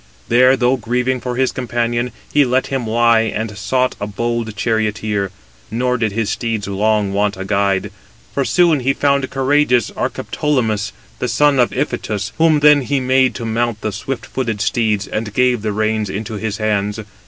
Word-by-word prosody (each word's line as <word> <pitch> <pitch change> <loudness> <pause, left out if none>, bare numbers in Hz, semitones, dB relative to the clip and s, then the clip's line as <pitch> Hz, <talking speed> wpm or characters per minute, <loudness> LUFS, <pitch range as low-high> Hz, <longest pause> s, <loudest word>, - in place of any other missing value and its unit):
There, 130 +3 +5
though 125 +1 +2
grieving 125 +1 -1
for 125 +1 -3
his 130 +1 +1
companion, 120 0 -2 0.2
he 145 - +5
let 130 0 +1
him 130 -4 -1
lie, 115 +1 +4
and 110 -1 -2
sought 125 +6 0
a 100 - -2
bold 115 +1 -3
charioteer: 110 -3 -1 0.4
nor 125 +3 0
did 110 -2 0
his 110 +1 -1
steeds 115 -4 -2
long 105 0 +1
want 100 0 0
a 95 - -5
guide; 100 -1 0 0.4
for 140 - 0
soon 170 -1 +3
he 135 +2 +1
found 140 -1 +1
courageous 135 -3 +2
Archeptolemus, 115 -7 -1 0.3
the 125 - -1
son 145 +1 +3
of 120 - +3
Iphitus, 110 -7 -2
whom 160 -2 +4
then 150 -1 +6
he 140 +2 0
made 130 0 +2
to 120 - -5
mount 115 0 -1
the 110 - -2
swift 135 +6 -5
footed 115 -5 -3
steeds, 110 -3 0
and 110 -1 -4
gave 125 -2 +2
the 110 0 -2
reins 110 0 -1
into 110 +3 -5
his 110 0 -3
hands. 105 -1 -1
115 Hz, 175 wpm, -18 LUFS, 105-130 Hz, 0.4 s, then